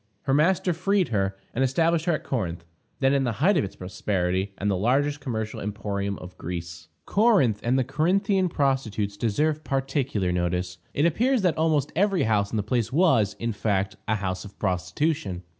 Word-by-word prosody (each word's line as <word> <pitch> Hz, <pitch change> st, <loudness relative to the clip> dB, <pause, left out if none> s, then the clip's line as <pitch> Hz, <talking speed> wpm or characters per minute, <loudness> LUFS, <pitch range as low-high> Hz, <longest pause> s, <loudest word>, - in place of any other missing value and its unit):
Her 135 Hz, -, 0 dB
master 175 Hz, +4 st, +3 dB
freed 185 Hz, -1 st, +1 dB
her, 95 Hz, -3 st, 0 dB, 0.2 s
and 130 Hz, -, +1 dB
established 165 Hz, +5 st, +2 dB
her 175 Hz, -, +2 dB
at -, -, -2 dB
Corinth, 90 Hz, -9 st, -3 dB, 0.4 s
then 135 Hz, 0 st, +4 dB
in 140 Hz, -1 st, +2 dB
the 120 Hz, -3 st, 0 dB
height 170 Hz, -, +3 dB
of 160 Hz, -, +2 dB
its 95 Hz, -, -6 dB
prosperity, 95 Hz, 0 st, -2 dB
and 100 Hz, -, -2 dB
the -, -, +1 dB
largest 140 Hz, +9 st, +1 dB
commercial 110 Hz, -6 st, -4 dB
emporium 100 Hz, -1 st, -3 dB
of 90 Hz, -1 st, -10 dB
Greece. 85 Hz, 0 st, -6 dB, 0.2 s
Corinth 195 Hz, -, +3 dB
and 125 Hz, +3 st, +1 dB
the 130 Hz, -, +3 dB
Corinthian 185 Hz, -, +1 dB
prostitutes 130 Hz, -9 st, 0 dB
deserve 150 Hz, +9 st, 0 dB
particular 135 Hz, -, -1 dB
notice. 90 Hz, 0 st, -1 dB, 0.2 s
It 145 Hz, -, +2 dB
appears 235 Hz, -, +2 dB
that 180 Hz, -3 st, +2 dB
almost 155 Hz, -3 st, +1 dB
every 195 Hz, +1 st, +2 dB
house 105 Hz, -2 st, +1 dB
in 110 Hz, -, -2 dB
the 105 Hz, -, 0 dB
place 115 Hz, +1 st, -1 dB
was, 135 Hz, -, +3 dB
in 115 Hz, -1 st, -2 dB
fact, 100 Hz, -2 st, -1 dB
a 110 Hz, -, +2 dB
house 95 Hz, -2 st, -3 dB
of 100 Hz, -, -12 dB
prostitution. 95 Hz, -, -1 dB
120 Hz, 180 wpm, -25 LUFS, 100-155 Hz, 0.4 s, then